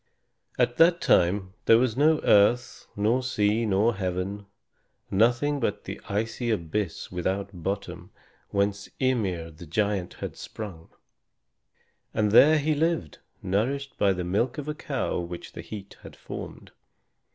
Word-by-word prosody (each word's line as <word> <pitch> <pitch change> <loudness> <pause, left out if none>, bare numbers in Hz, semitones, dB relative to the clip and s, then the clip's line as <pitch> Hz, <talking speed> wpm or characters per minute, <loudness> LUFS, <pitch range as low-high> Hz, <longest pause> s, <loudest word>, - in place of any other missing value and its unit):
At 120 -1 +1
that 170 +1 +5
time 95 - +2
there 115 - +7
was 120 -2 +1
no 155 +2 +3
earth 120 +4 +3
nor 110 +5 +2
sea 110 -3 +1
nor 105 +4 +3
heaven, 95 +2 -3 0.6
nothing 120 +8 +2
but 115 -5 -2
the - - -7
icy 115 +4 -2
abyss 100 -2 -2
without 95 +3 -2
bottom, 95 +3 -5 0.4
whence 100 0 -1
Ymir 95 -11 0
the 80 +2 -12
giant 100 +1 -1
had - - -6
sprung. 95 -7 -8 1.3
And 105 -2 +2
there 155 +8 +7
he 155 +1 +1
lived, 155 - -1 0.2
nourished 125 +8 -1
by 100 - +4
the 90 -1 -2
milk 105 - 0
of 150 -1 -5
a 150 - -1
cow 150 - -2
which 85 0 -7
the - - -7
heat 100 -2 -9
had - - -12
formed. - - -9
105 Hz, 140 wpm, -26 LUFS, 95-125 Hz, 1.3 s, there